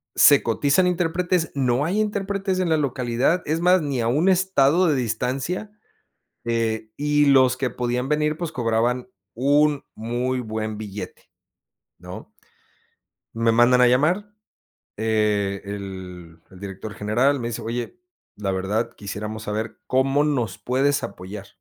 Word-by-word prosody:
¿Se 145 -1 +6
cotizan 140 +10 +2
intérpretes? 175 -1 0
¿No 130 0 +1
hay 195 +6 +1
intérpretes 195 -2 -2
en 185 - +1
la 160 - +3
localidad? 130 +3 0
Es 160 +2 -1
más, 180 0 +4
ni 140 -4 -2
a 115 - 0
un 150 +9 +2
estado 180 -3 +3
de 150 - +2
distancia, 130 - -2 0.7
eh, 115 -1 -1
y 150 0 +2
los 130 -2 +5
que 130 -1 -1
podían 125 +2 -2
venir, 150 +1 +1
pues, 170 -1 -4
cobraban 120 +1 0 0.3
un 145 +3 +2
muy 120 +3 -2
buen 110 -2 -4
billete, 105 -2 -8 0.7
¿no? - - -10 1.0
Me 115 0 +2
mandan 120 +2 +5
a - - +7
llamar, 175 +12 +1 0.7
eh, 105 -2 0
el 95 -4 -8
director 95 +3 -8
general 120 +8 +1
me 120 - -3
dice: 115 - -5
"Oye, 120 - -5 0.4
la 100 -2 -2
verdad 95 +4 -1
quisiéramos 105 +2 -6
saber, 110 +1 -4
¿cómo 135 +2 +2
nos 125 -10 -1
puedes 135 +6 0
apoyar?". 100 +1 -7
125 Hz, 135 wpm, -23 LUFS, 110-150 Hz, 1.0 s, a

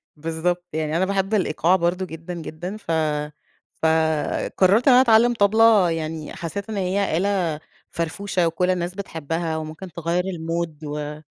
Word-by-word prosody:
بالضبط، 165 +3 -2
يعني 155 0 -1
أنا 185 - +2
باحب 195 +1 -1
الإيقاع 180 -3 +2
برضه 180 +1 0
جدًا، 165 +1 -8
جدًا، 175 +4 -6
ف 205 - -6 0.9
فقررت 160 - +2
إن 265 - +8
أنا 250 - +8
أتعلم 235 -1 +5
طبلة، 215 -3 +5
يعني 160 -1 -4
حسيت 195 +6 -5
إن 215 - -3
هي 190 -2 0
آلة 180 -5 0 0.3
فرفوشة 175 +2 -1
وكل 180 +2 0
الناس 180 0 -1
بتحبها 165 -3 -3
وممكن 160 +4 -7
تغيّر 170 +2 -1
الMood 165 -3 -4
و 150 +1 -5
175 Hz, 145 wpm, -23 LUFS, 160-195 Hz, 0.9 s, إن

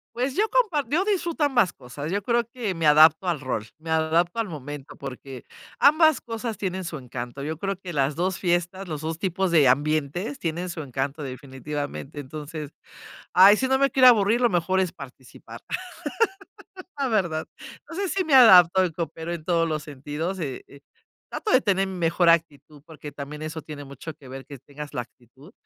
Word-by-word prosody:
Pues, 255 +3 -1
yo 435 +2 +1
compar 400 - +1
yo 340 +8 +1
disfruto 345 -6 -1
ambas 245 - +2
cosas. 140 +5 -7
Yo 200 - -1
creo 235 +1 +1
que 230 -6 -3
me 165 -2 0
adapto 155 +4 +6
al 170 -4 0
rol, 130 -6 -3
me 160 +1 -7
adapto 165 +5 +1
al 225 - 0
momento, 145 -1 -8
porque 135 -1 -9 0.4
ambas 310 +1 +5
cosas 230 -1 -5
tienen 190 -1 -3
su 170 -3 -5
encanto. 125 +1 -7
Yo 155 +2 -4
creo 195 +4 -2
que 180 -2 -7
las 140 0 0
2 180 +2 -1
fiestas, 180 +1 -1
los 155 -3 -5
2 160 +1 -4
tipos 190 0 -1
de 155 -5 +5
ambientes 155 - 0
tienen 170 +2 -3
su 170 -2 -5
encanto, 135 +2 -4
definitivamente. 140 +2 -6
Entonces, 150 +1 -7 0.6
ay, 195 +3 +8
si 260 - 0
no 265 0 +3
me 275 0 +2
quiero 260 -1 +6
aburrir, 225 0 +5
lo 240 - +4
mejor 185 +1 +1
es 185 -2 0
participar, 130 -2 -12 1.4
la 275 - 0
verdad. 175 -9 0 0.4
No 330 - -8
sé 395 0 -1
si 375 +1 -1
me 300 - +1
adapto 190 -7 +8
y 175 - -2
coopero 165 0 -5
en 170 -3 -6
todos 170 -1 +1
los 155 -1 -2
sentidos 150 +5 -5
y, 135 -6 -4
eh, 140 - -16 0.5
trato 430 - -3
de 255 - +5
tener 195 -3 +1
mejor 175 -1 +1
actitud, 155 -3 0
porque 155 -2 -10
también 145 +2 -8
eso 155 +1 -5
tiene 145 -2 -9
mucho 140 +3 -9
que 135 - -16
ver, 135 +1 -8
que 140 -2 -10
tengas 145 +3 -10
la 125 - -1
actitud 130 - -19
165 Hz, 190 wpm, -24 LUFS, 145-200 Hz, 1.4 s, ay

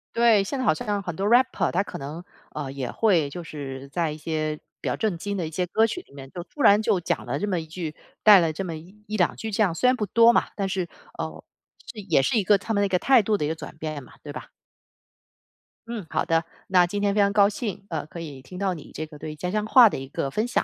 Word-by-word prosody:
对， 230 -4 +5
现 265 +7 -4
在 - - -1
好 - - +5
像 205 +4 -2
很 175 -4 -5
多 195 +3 -1
rapper 245 +4 +3
他 180 - +2
可 - - -6
能， 150 +5 -7 0.3
呃， 140 -3 -5
也 135 -3 -4
会 180 -10 +2
就 175 +2 -6
是 140 -4 -7
在 165 +1 -1
一 150 - -7
些 155 -1 -2 0.2
比 - - -5
较 - - 0
正 210 -6 -1
经 200 +4 -4
的 170 -4 -2
一 - - -6
些 180 +3 -1
歌 220 +6 +2
曲 - - -4
里 - - -23
面， 135 -1 -10
就 175 +3 -7
突 290 - -9
然 205 -3 +7
就 200 -4 +1
讲 175 - -2
了 - - -2
这 205 - -1
么 180 -4 0
一 160 - -6
句 160 -1 -6 0.3
带 210 -2 +9
了 165 -2 +1
这 175 - -4
么 170 -3 -4
1 190 +7 -15
1-2 210 -5 +1
句 220 - -5
这 215 +2 +2
样， 180 -5 +1
虽 210 +10 +1
然 255 - +5
不 210 - -2
多 230 +4 +6
嘛， - - +1
但 195 -2 -2
是， 185 -2 -2 0.3
呃， - - -5 0.5
是 220 - -10
也 170 -9 +2
是 220 - +1
一 205 - +2
个 200 0 +4
他 220 +2 -3
们 200 - +2
那 - - +2
个 180 -2 +1
态 260 -5 +5
度 215 +1 +1
的 - - -2
一 - - +1
个 160 - -2
转 - - -9
变 155 -3 -4
嘛， - - -16
对 145 - -8
吧？ - - -8 1.4
嗯， 225 -6 -5
好 - - 0
的， 165 0 +1 0.2
那 180 -2 +4
今 205 +3 -3
天 200 -1 +2
非 210 - +1
常 200 0 +3
高 200 -1 +5
兴， 205 -3 -5
呃， 160 -3 -3
可 165 +2 -9
以 140 -5 -8
听 180 +8 -11
到 195 -1 0
你 160 - -10
这 155 - -4
个 150 -2 -13
对 155 -1 -6
家 180 +4 -4
乡 210 +1 0
话 235 0 +8
的 - - -4
一 135 - -7
个 135 - -3
分 215 +7 0
享， - - +1
180 Hz, 310 characters per minute, -25 LUFS, 155-210 Hz, 1.4 s, 带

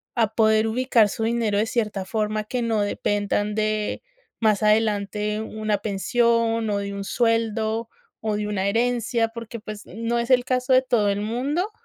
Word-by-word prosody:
a 230 -3 +3
poder 220 0 +4
ubicar 235 -2 +3
su 225 - -4
dinero 225 -3 0
de 215 - +2
cierta 215 -4 -1
forma 215 0 -1
que 245 +4 -3
no 225 -3 +1
dependan 205 0 -1
de 215 - -1 0.4
más 215 -2 +2
adelante 210 -1 +1
una 215 -1 -2
pensión, 230 +2 +1
o 205 - 0
de 200 0 -4
un 200 0 -5
sueldo, 225 0 0 0.3
o 215 -1 -1
de 210 0 -2
una 200 -2 -1
herencia, 230 +1 +1
porque 230 0 -8
pues 215 -1 -8
no 230 +4 -2
es 235 - -3
el 250 -1 +5
caso 255 0 +1
de 255 - +6
todo 240 -5 +1
el 200 0 0
mundo. 270 - -1
220 Hz, 170 wpm, -24 LUFS, 210-235 Hz, 0.4 s, de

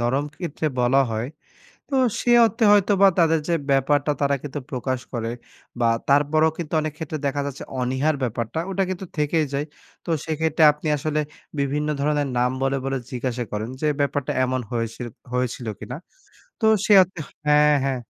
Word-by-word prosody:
নরম 130 +5 +1
ক্ষেত্রে 160 -2 -3
বলা 125 +3 +4
হয়। 110 +2 -2 0.6
তো 275 - -1 0.3
সে 240 - +1
অর্থে 225 +2 -1
হয়তো 205 0 +4
বা 195 - +9
তাদের 165 -1 +4
যে 170 - +1 0.2
ব্যাপারটা 140 +2 +2
তারা 140 0 +2
কিন্তু 145 0 -5
প্রকাশ 130 0 -2
করে 115 -1 -2 0.5
বা 120 - +2 0.2
তারপরেও 150 +3 +4
কিন্তু 165 -2 -6
অনেক 155 -1 -3
ক্ষেত্রে 160 -1 -4
দেখা 140 +1 0
যাচ্ছে 140 -1 -6 0.2
অনীহার 130 +5 +1
ব্যাপারটা 115 +4 -2
ওটা 195 0 +1
কিন্তু 185 0 -4
থেকেই 150 +1 +1
যায়। 145 +2 -1 0.4
তো - - -7 0.2
সেক্ষেত্রে 160 0 +1
আপনি 150 +1 -7
আসলে 150 +1 -1 0.4
বিভিন্ন 145 +2 0
ধরনের 145 0 +1
নাম 125 +1 +3
বলে, 135 0 +1
বলে 135 0 -1
জিজ্ঞাসা 125 -1 -2
করেন, 110 +3 -3
যে 155 - +1
ব্যাপারটা 140 -1 0
এমন 130 0 -1
হয়েছে, 115 0 -3 0.3
হয়েছিল 125 -1 -2
কিনা? - - -6 0.6
তো 225 - 0 0.2
সে 210 - +5
অর্থে 185 -1 -2 0.3
হ্যাঁ, 150 0 +5
হ্যাঁ। 135 -2 -1
145 Hz, 170 wpm, -23 LUFS, 130-155 Hz, 0.6 s, বা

